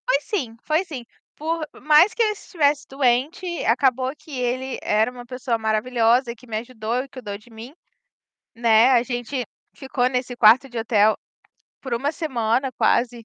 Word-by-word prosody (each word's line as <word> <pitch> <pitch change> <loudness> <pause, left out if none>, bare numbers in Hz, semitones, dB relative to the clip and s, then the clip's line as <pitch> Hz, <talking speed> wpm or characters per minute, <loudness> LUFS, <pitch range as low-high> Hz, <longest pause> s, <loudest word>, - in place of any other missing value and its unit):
Foi - - +3
sim, 265 - -4
foi 310 +4 +1
sim, 285 -10 -8 0.3
por 320 0 -3
mais 305 +6 +5
que - - -2
ele 430 - +2
estivesse 305 -8 0
doente, 270 +6 0 0.2
acabou 255 +2 +2
que 305 - -17
ele 255 +1 -2
era 215 +2 +2
uma 245 -1 -11
pessoa 250 -1 -2
maravilhosa 235 +2 +1
que 250 +2 -19
me 220 -2 -3
ajudou 235 +1 -3
e - - -12
cuidou 210 -6 -7
de 215 +4 -21
mim, 230 +4 -11 0.8
né, 230 +1 +4
a 245 -3 +4
gente 245 +1 -4 0.3
ficou 265 -2 -1
nesse 250 -1 -3
quarto 240 +4 +6
de 240 -2 -6
hotel, 220 -2 +3 0.6
por 260 -3 -3
1 270 +5 -1
semana 255 -4 -1
quase, 235 0 +1
250 Hz, 165 wpm, -22 LUFS, 230-275 Hz, 0.8 s, quarto